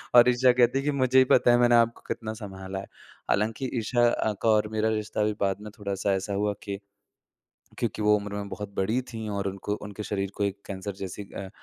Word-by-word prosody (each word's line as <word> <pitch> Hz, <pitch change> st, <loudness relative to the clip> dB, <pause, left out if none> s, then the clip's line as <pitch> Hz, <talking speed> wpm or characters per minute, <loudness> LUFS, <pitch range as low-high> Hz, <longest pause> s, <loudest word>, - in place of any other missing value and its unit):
और 120 Hz, 0 st, +9 dB
ईशा 125 Hz, +1 st, +5 dB
कहती 125 Hz, +1 st, +3 dB
है -, -, -3 dB
कि 150 Hz, -, +2 dB
मुझे 130 Hz, -2 st, +2 dB
ही -, -, +8 dB
पता 120 Hz, -, +5 dB
है 120 Hz, -, +5 dB
मैंने 120 Hz, 0 st, +5 dB
आपको 115 Hz, 0 st, +3 dB
कितना 110 Hz, -1 st, -3 dB
सँभाला 95 Hz, -2 st, -7 dB
है। 95 Hz, -, -7 dB, 0.5 s
हालाँकि 110 Hz, +5 st, 0 dB
ईशा 120 Hz, +2 st, +2 dB
अ, 110 Hz, -2 st, 0 dB
का 115 Hz, -, +2 dB
और 105 Hz, -1 st, +4 dB
मेरा 110 Hz, 0 st, +1 dB
रिश्ता 110 Hz, -1 st, -1 dB
भी 105 Hz, 0 st, +1 dB
बाद 100 Hz, 0 st, 0 dB
में 105 Hz, 0 st, -8 dB
थोड़ा-सा 100 Hz, -1 st, -1 dB
ऐसा 95 Hz, +1 st, -2 dB
हुआ 105 Hz, +1 st, 0 dB
के 100 Hz, -1 st, -4 dB, 1.0 s
क्योंकि -, -, -2 dB
वो 105 Hz, 0 st, +5 dB
उम्र 100 Hz, 0 st, -5 dB
में 100 Hz, 0 st, -4 dB
बहुत 105 Hz, 0 st, -6 dB
बड़ी 110 Hz, +6 st, +1 dB
थी 110 Hz, -1 st, -5 dB
और 100 Hz, -1 st, -2 dB
उनको 100 Hz, +2 st, -3 dB
उनके 105 Hz, 0 st, -6 dB
शरीर 100 Hz, -2 st, -2 dB
को 100 Hz, -, 0 dB
एक 100 Hz, 0 st, -2 dB
कैंसर 100 Hz, +1 st, -5 dB
जैसी 95 Hz, +1 st, -5 dB
अ, 95 Hz, -, -5 dB
105 Hz, 225 wpm, -27 LUFS, 100-115 Hz, 1.0 s, और